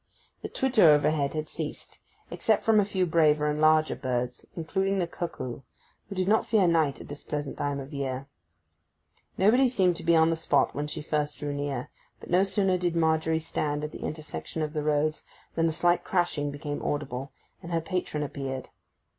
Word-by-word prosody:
The -, -, -5 dB
twitter 250 Hz, -10 st, +4 dB
overhead 150 Hz, -1 st, +3 dB
had 155 Hz, 0 st, -2 dB
ceased, -, -, -6 dB, 0.3 s
except 220 Hz, -2 st, +1 dB
from 220 Hz, -1 st, +5 dB
a 205 Hz, -, +3 dB
few 190 Hz, -2 st, 0 dB
braver 155 Hz, -3 st, +3 dB
and 150 Hz, 0 st, 0 dB
larger 155 Hz, 0 st, +4 dB
birds, 125 Hz, -2 st, -3 dB
including 190 Hz, +4 st, -1 dB
the 180 Hz, -, +1 dB
cuckoo, 165 Hz, -8 st, -5 dB, 0.5 s
who 195 Hz, -, -6 dB
did 185 Hz, 0 st, 0 dB
not 220 Hz, +2 st, +4 dB
fear 205 Hz, -5 st, +4 dB
night 160 Hz, -5 st, +2 dB
at -, -, -10 dB
this 145 Hz, 0 st, -8 dB
pleasant 145 Hz, -2 st, -4 dB
time 145 Hz, -1 st, -2 dB
of 135 Hz, +2 st, -8 dB
year. 135 Hz, -1 st, -3 dB, 1.1 s
Nobody 245 Hz, +7 st, +5 dB
seemed 185 Hz, -7 st, +2 dB
to -, -, -8 dB
be 170 Hz, 0 st, +4 dB
on 160 Hz, 0 st, +5 dB
the -, -, +1 dB
spot 165 Hz, -, +1 dB
when 145 Hz, +1 st, -3 dB
she 150 Hz, -, -5 dB
first 150 Hz, -1 st, -1 dB
drew 145 Hz, -1 st, -3 dB
near, 140 Hz, -3 st, -3 dB, 0.3 s
but -, -, -11 dB
no 180 Hz, +2 st, +5 dB
sooner 195 Hz, -1 st, +1 dB
did 175 Hz, -1 st, 0 dB
Margery 160 Hz, 0 st, +2 dB
stand 150 Hz, -2 st, -2 dB
at 150 Hz, -, -4 dB
the -, -, -9 dB
intersection 155 Hz, +1 st, -5 dB
of 150 Hz, 0 st, -3 dB
the 155 Hz, -, -1 dB
roads 150 Hz, +1 st, 0 dB, 0.3 s
than 165 Hz, 0 st, +2 dB
a -, -, +1 dB
slight 175 Hz, +2 st, +2 dB
crashing 175 Hz, -5 st, 0 dB
became 145 Hz, 0 st, -5 dB
audible, 135 Hz, -2 st, -3 dB, 0.3 s
and 170 Hz, -, -8 dB
her 165 Hz, -, +2 dB
patron 165 Hz, -3 st, -2 dB
appeared. 135 Hz, -2 st, -5 dB
155 Hz, 190 wpm, -28 LUFS, 145-175 Hz, 1.1 s, from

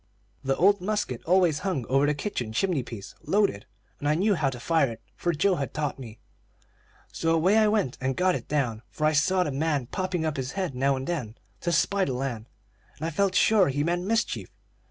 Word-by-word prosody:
The 135 Hz, 0 st, +1 dB
old 200 Hz, +4 st, +4 dB
musket 210 Hz, +3 st, -2 dB
always 175 Hz, -3 st, +3 dB
hung 165 Hz, -10 st, -2 dB
over 135 Hz, +4 st, +2 dB
the 150 Hz, -, +1 dB
kitchen 125 Hz, -, -4 dB
chimney 175 Hz, +3 st, +1 dB
piece, 115 Hz, -5 st, -9 dB
loaded, 200 Hz, -, +1 dB, 0.3 s
and 145 Hz, -, -1 dB
I 150 Hz, -, +3 dB
knew 200 Hz, +5 st, +2 dB
how 155 Hz, -7 st, +1 dB
to 125 Hz, -2 st, -7 dB
fire 160 Hz, 0 st, +2 dB
it, 115 Hz, -1 st, -9 dB
for 175 Hz, -, 0 dB
Joe 180 Hz, +4 st, +2 dB
had 140 Hz, -, -4 dB
taught 150 Hz, -2 st, -2 dB
me. 115 Hz, -4 st, -9 dB, 0.9 s
So 165 Hz, 0 st, +1 dB
away 180 Hz, +6 st, +3 dB
I 215 Hz, -, +4 dB
went 210 Hz, -, 0 dB
and 130 Hz, 0 st, 0 dB
got 185 Hz, 0 st, +3 dB
it -, -, -5 dB
down; 125 Hz, -7 st, -1 dB
for 155 Hz, -, -2 dB
I 155 Hz, -, +4 dB
saw 180 Hz, +5 st, +3 dB
the 150 Hz, -, -3 dB
man 145 Hz, -1 st, 0 dB
popping 180 Hz, +3 st, -2 dB
up 155 Hz, -2 st, -2 dB
his 130 Hz, 0 st, -3 dB
head 185 Hz, -7 st, -2 dB
now 135 Hz, +2 st, +1 dB
and 130 Hz, 0 st, -4 dB
then 125 Hz, -10 st, -4 dB, 0.2 s
to 175 Hz, -, -1 dB
spy 195 Hz, +4 st, +2 dB
the 130 Hz, -, -2 dB
land, 125 Hz, -3 st, -4 dB, 0.5 s
and 155 Hz, -, -4 dB
I 165 Hz, -, -1 dB
felt 200 Hz, -1 st, +1 dB
sure 205 Hz, -3 st, +5 dB
he 145 Hz, +2 st, 0 dB
meant 175 Hz, +2 st, 0 dB
mischief. 225 Hz, +3 st, -1 dB
155 Hz, 215 wpm, -26 LUFS, 135-185 Hz, 0.9 s, sure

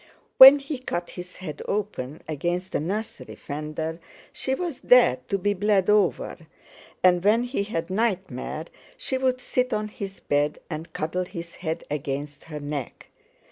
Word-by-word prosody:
When 270 Hz, +2 st, +13 dB
he 275 Hz, -1 st, -5 dB
cut 175 Hz, -8 st, -4 dB
his 180 Hz, 0 st, -9 dB
head 155 Hz, -6 st, -7 dB
open 190 Hz, -9 st, -3 dB
against 175 Hz, +5 st, -2 dB
the -, -, 0 dB
nursery 205 Hz, +8 st, -4 dB
fender 155 Hz, +2 st, -5 dB, 0.3 s
she 265 Hz, -, -1 dB
was 340 Hz, -3 st, -4 dB
there 250 Hz, -, +6 dB
to 200 Hz, -, 0 dB
be 205 Hz, +2 st, +1 dB
bled 205 Hz, 0 st, +2 dB
over; 210 Hz, -3 st, +1 dB, 0.6 s
and 180 Hz, -1 st, +5 dB
when 220 Hz, +4 st, +4 dB
he 245 Hz, -3 st, -2 dB
had 170 Hz, -4 st, -3 dB
nightmare 185 Hz, -, -2 dB, 0.3 s
she 270 Hz, -, -2 dB
would 255 Hz, -1 st, +1 dB
sit 250 Hz, 0 st, -1 dB
on 215 Hz, 0 st, -1 dB
his 195 Hz, -2 st, -7 dB
bed 145 Hz, +1 st, 0 dB
and 155 Hz, +1 st, -5 dB
cuddle 180 Hz, +4 st, -2 dB
his 170 Hz, -2 st, -8 dB
head 165 Hz, -1 st, -3 dB
against 145 Hz, 0 st, -4 dB
her 150 Hz, -2 st, -6 dB
neck. 145 Hz, -3 st, -6 dB
180 Hz, 155 wpm, -25 LUFS, 155-215 Hz, 0.6 s, When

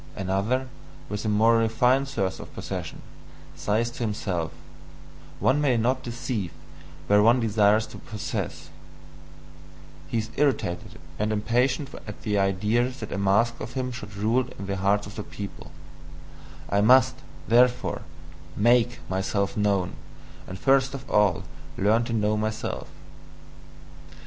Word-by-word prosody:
Another, 100 Hz, +7 st, 0 dB, 0.4 s
with 105 Hz, 0 st, -3 dB
a -, -, +1 dB
more 115 Hz, +2 st, +4 dB
refined 125 Hz, +4 st, +3 dB
thirst 95 Hz, -8 st, -1 dB
for -, -, -8 dB
possession, -, -, -6 dB, 0.5 s
says 115 Hz, +3 st, 0 dB
to -, -, -11 dB
himself: 95 Hz, -7 st, -2 dB, 0.9 s
"One 145 Hz, +3 st, +3 dB
may 130 Hz, -5 st, +3 dB
not 125 Hz, +3 st, +1 dB
deceive 120 Hz, -5 st, -3 dB, 0.6 s
where 105 Hz, 0 st, +5 dB
one 115 Hz, +4 st, +5 dB
desires 110 Hz, -1 st, +3 dB
to -, -, -11 dB
possess" 110 Hz, -2 st, -5 dB, 1.4 s
he 95 Hz, -, -2 dB
is 110 Hz, 0 st, -3 dB
irritated 130 Hz, -12 st, 0 dB, 0.2 s
and 105 Hz, +1 st, 0 dB
impatient 125 Hz, +6 st, 0 dB
at 105 Hz, -, -8 dB
the 105 Hz, -2 st, +1 dB
idea 105 Hz, +6 st, +1 dB
that 125 Hz, -5 st, -8 dB
a 100 Hz, -, -2 dB
mask 100 Hz, +5 st, +2 dB
of 125 Hz, -, -6 dB
him 130 Hz, -1 st, -2 dB
should 105 Hz, -4 st, -8 dB
rule 115 Hz, +5 st, +1 dB
in 100 Hz, -, -6 dB
the 100 Hz, 0 st, -2 dB
hearts 100 Hz, +2 st, +2 dB
of 100 Hz, -, -9 dB
the 105 Hz, -, -3 dB
people: 100 Hz, -1 st, -8 dB, 1.0 s
"I 100 Hz, -, +2 dB
must, 130 Hz, +3 st, +5 dB, 0.3 s
therefore, 125 Hz, +2 st, +3 dB, 0.6 s
MAKE 120 Hz, +3 st, +3 dB
myself 95 Hz, +1 st, -1 dB
known, 100 Hz, -3 st, 0 dB, 0.5 s
and 95 Hz, -, -6 dB
first 135 Hz, +5 st, +3 dB
of 135 Hz, 0 st, -8 dB
all 105 Hz, -5 st, +3 dB, 0.3 s
learn 110 Hz, +4 st, +3 dB
to 115 Hz, -, -3 dB
know 105 Hz, -1 st, +1 dB
myself!" 110 Hz, +1 st, -3 dB
110 Hz, 135 wpm, -26 LUFS, 100-125 Hz, 1.4 s, where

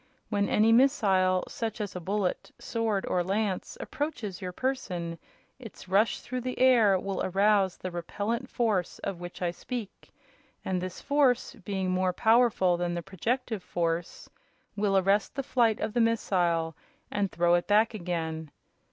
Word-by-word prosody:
When 205 Hz, -2 st, 0 dB
any 220 Hz, +2 st, +4 dB
missile, 195 Hz, -8 st, +3 dB
such 225 Hz, -1 st, -4 dB
as 205 Hz, -3 st, -4 dB
a -, -, -3 dB
bullet, 190 Hz, +1 st, -2 dB
sword 225 Hz, -4 st, -1 dB
or 180 Hz, -, 0 dB
lance, 195 Hz, +1 st, -2 dB
approaches 240 Hz, -, -4 dB
your 180 Hz, -1 st, -4 dB
person, 180 Hz, -9 st, -3 dB, 0.4 s
its 225 Hz, -6 st, -11 dB
rush 200 Hz, +4 st, +2 dB
through 255 Hz, 0 st, -4 dB
the 255 Hz, +1 st, -4 dB
air 235 Hz, -7 st, +5 dB
will 195 Hz, +1 st, -3 dB
arouse 195 Hz, 0 st, +2 dB
the 185 Hz, -, -5 dB
repellent 210 Hz, +8 st, -3 dB
force 210 Hz, -7 st, 0 dB
of 185 Hz, -, -3 dB
which 175 Hz, +1 st, -7 dB
I 175 Hz, -, +1 dB
speak, 225 Hz, +3 st, -7 dB, 0.6 s
and 185 Hz, -1 st, -1 dB
this 185 Hz, 0 st, -6 dB
force, 275 Hz, -3 st, +2 dB
being 190 Hz, -4 st, -3 dB
more 185 Hz, 0 st, +1 dB
powerful 220 Hz, -5 st, +3 dB
than 175 Hz, 0 st, -2 dB
the 170 Hz, -, -4 dB
projective 225 Hz, +4 st, -2 dB
force, 170 Hz, -1 st, -3 dB, 0.5 s
will 200 Hz, -1 st, +2 dB
arrest 195 Hz, +2 st, +2 dB
the 275 Hz, -, -2 dB
flight 235 Hz, -4 st, +2 dB
of 215 Hz, 0 st, -2 dB
the 240 Hz, -, +2 dB
missile 175 Hz, -8 st, +1 dB, 0.4 s
and 200 Hz, -2 st, -1 dB
throw 175 Hz, 0 st, +2 dB
it 175 Hz, 0 st, +2 dB
back 215 Hz, +3 st, +4 dB
again. 165 Hz, -5 st, -3 dB
200 Hz, 155 wpm, -28 LUFS, 180-230 Hz, 0.6 s, air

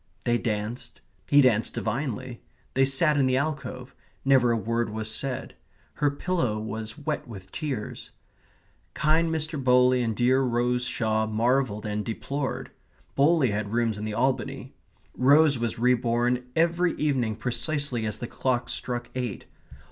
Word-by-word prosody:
They 120 Hz, -1 st, +2 dB
danced. 110 Hz, +2 st, -3 dB, 0.3 s
He 145 Hz, 0 st, +6 dB
danced 115 Hz, -4 st, +2 dB
divinely. 130 Hz, -2 st, -3 dB, 0.3 s
They 135 Hz, 0 st, +4 dB
sat 145 Hz, +3 st, +3 dB
in 135 Hz, -2 st, +3 dB
the 130 Hz, 0 st, +2 dB
alcove; 135 Hz, -3 st, -3 dB, 0.3 s
never 130 Hz, -3 st, +5 dB
a 115 Hz, -, +2 dB
word 115 Hz, +2 st, -1 dB
was 110 Hz, 0 st, -4 dB
said. 135 Hz, +2 st, -4 dB, 0.4 s
Her 145 Hz, -, +1 dB
pillow 140 Hz, -6 st, -1 dB
was 110 Hz, 0 st, -5 dB
wet 150 Hz, 0 st, -3 dB
with 95 Hz, -5 st, -10 dB
tears. 135 Hz, -8 st, -5 dB, 0.9 s
Kind 160 Hz, +2 st, +2 dB
Mr. 155 Hz, -3 st, -2 dB
Bowley 125 Hz, 0 st, +4 dB
and 115 Hz, -2 st, -1 dB
dear 130 Hz, +3 st, +3 dB
Rose 125 Hz, 0 st, +1 dB
Shaw 110 Hz, -2 st, 0 dB
marvelled 115 Hz, 0 st, +1 dB
and 105 Hz, 0 st, -2 dB
deplored. 135 Hz, +5 st, -4 dB, 0.4 s
Bowley 140 Hz, -3 st, +3 dB
had 105 Hz, +1 st, -3 dB
rooms 115 Hz, -3 st, +1 dB
in 105 Hz, -, -4 dB
the 110 Hz, -1 st, -3 dB
Albany. 130 Hz, +3 st, -1 dB, 0.4 s
Rose 140 Hz, +1 st, +5 dB
was 115 Hz, -1 st, -2 dB
re 125 Hz, +2 st, +4 dB
born 120 Hz, +1 st, 0 dB
every 170 Hz, +1 st, +2 dB
evening 130 Hz, -7 st, 0 dB
precisely 125 Hz, 0 st, -1 dB
as 105 Hz, 0 st, -3 dB
the 120 Hz, -, -5 dB
clock 125 Hz, 0 st, -1 dB
struck 120 Hz, -1 st, -3 dB
eight. 125 Hz, -5 st, -4 dB
125 Hz, 150 wpm, -26 LUFS, 115-140 Hz, 0.9 s, He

